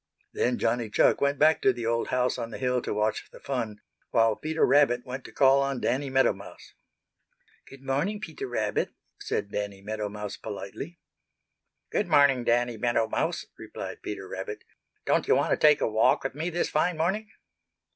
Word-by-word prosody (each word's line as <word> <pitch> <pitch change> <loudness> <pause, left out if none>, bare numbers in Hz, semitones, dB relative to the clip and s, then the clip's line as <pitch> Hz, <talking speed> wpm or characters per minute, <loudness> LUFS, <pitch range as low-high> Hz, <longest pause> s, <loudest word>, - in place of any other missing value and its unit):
Then 125 0 +1
Johnny 120 -2 0
Chuck - - +3
went 140 0 +2
back 155 +1 +4
to 130 - +5
the 120 -2 -5
old 115 0 0
house 125 0 0
on 115 -1 -4
the - - -7
hill 125 -1 0
to - - -4
watch 105 +1 -1
the - - -14
fun, 115 -6 -4 0.3
while 115 -2 +3
Peter 160 +5 0
Rabbit 125 -4 +3
went 130 +1 -6
to - - -10
call 135 0 +5
on 135 -2 -1
Danny 135 +3 -1
Meadow 130 -3 +3
Mouse. 100 +1 -13 0.9
"Good 135 0 -14
morning, 145 +11 -1
Peter 400 - -6
Rabbit," - - -1 0.2
said 435 +1 -3
Danny 100 -1 -4
Meadow 105 0 -3
Mouse 105 0 -6
politely. 100 - -7 0.9
"Good 205 - 0
morning, 140 -5 +4
Danny 120 0 +1
Meadow 115 0 +1
Mouse," - - -1
replied - - -7
Peter 95 -2 -6
Rabbit. 95 +2 -6 0.4
"Don't - - +1
you - - +5
want - - +1
to - - +5
take 150 -1 +5
a - - +2
walk 110 0 +3
with 135 - -3
me 160 +5 -3
this 175 0 -1
fine 165 +2 +1
morning?" 195 +7 -1
125 Hz, 185 wpm, -27 LUFS, 110-145 Hz, 0.9 s, to